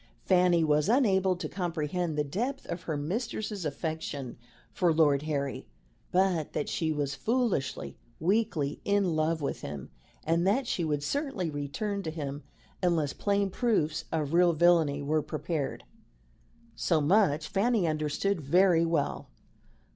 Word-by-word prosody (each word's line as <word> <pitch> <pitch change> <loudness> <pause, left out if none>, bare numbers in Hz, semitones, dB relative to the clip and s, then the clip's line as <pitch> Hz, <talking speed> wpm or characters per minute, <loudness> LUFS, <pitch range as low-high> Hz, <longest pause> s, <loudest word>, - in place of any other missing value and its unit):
Fanny 180 -2 +4
was 150 +3 +2
unable 195 -7 +3
to 180 - -5
comprehend 170 -2 -2
the 150 - +2
depth 240 - -3
of 170 - -5
her 160 -4 -3
mistress's 205 - -3
affection 150 -4 -4 0.4
for 175 -2 +2
Lord 150 -3 +3
Harry; 140 -3 -3 0.4
but 180 -4 +1
that 150 - -2
she 160 -1 -1
was 145 -2 -1
foolishly, 185 - -1 0.2
weakly 175 -6 0
in 200 -4 +1
love 160 0 0
with - - -3
him, 70 -2 -7 0.3
and 170 +3 +1
that 250 +7 +2
she 180 - -1
would 150 -2 -1
certainly 270 - -2
return 150 +9 -3
to 160 - -4
him 145 -3 -5 0.4
unless 165 -6 +1
plain 200 -1 0
proofs 185 -10 0
of 155 -2 -1
real 175 0 +5
villainy 155 -3 +3
were 155 +2 +1
prepared 155 -1 -3 0.9
so 165 -3 +1
much 155 -2 +3
Fanny 210 +1 +1
understood 155 +4 -1
very 170 +3 +4
well. 165 -4 -1
165 Hz, 140 wpm, -29 LUFS, 150-195 Hz, 0.9 s, real